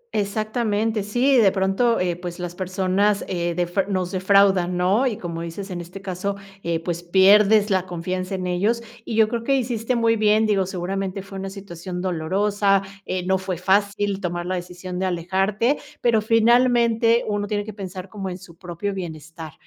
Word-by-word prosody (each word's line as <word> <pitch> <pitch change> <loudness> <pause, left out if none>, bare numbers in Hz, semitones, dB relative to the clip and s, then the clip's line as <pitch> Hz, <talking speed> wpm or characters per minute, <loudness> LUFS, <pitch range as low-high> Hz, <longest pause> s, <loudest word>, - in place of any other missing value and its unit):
exactamente. 215 +1 0
Sí, 245 +7 +2
de 205 -5 +5
pronto, 195 +5 +1
eh, 180 -1 0
pues, 175 0 -7
las 175 -1 -5
personas, 190 +2 0
eh, 170 -2 -2
defra 180 +3 0
nos 185 -3 -1
defraudan, 190 -2 +3
¿no? 195 +9 +2
Y 225 -5 -2
como 170 -5 -5
dices, 185 +4 -6
en 175 - -4
este 180 +3 -10
caso, 195 +1 -3 0.3
eh, 170 -1 -1
pues, 170 0 -4
pierdes 200 +4 +5
la 185 -1 +1
confianza 185 +2 -3
en 185 - -4
ellos, 205 +7 0 0.2
y 225 - -4
yo 220 -1 +5
creo 230 +1 -3
que 275 +3 +2
hiciste 245 -1 -1
muy 230 -1 +3
bien, 215 0 +3
digo, 195 -3 +1
seguramente, 190 +1 -3
fue 195 -1 -8
una 195 0 -4
situación 185 -2 -7
dolorosa, 195 +3 +1 0.2
eh, 185 -1 -2
no 190 0 +2
fue 185 -1 -4
fácil 200 +2 +1
tomar 175 -1 -3
la 185 - -2
decisión 180 0 -5
de 190 - 0
alejarte, 190 - 0 0.2
pero, 230 -3 +3
finalmente, 235 0 +3
uno 205 -1 -1
tiene 205 0 -1
que 215 0 -8
pensar 185 -2 -7
como 195 -1 -6
en 180 - -5
su 180 -3 -15
propio 180 +3 -4
bienestar, 160 -3 -7
195 Hz, 180 wpm, -23 LUFS, 180-210 Hz, 0.3 s, de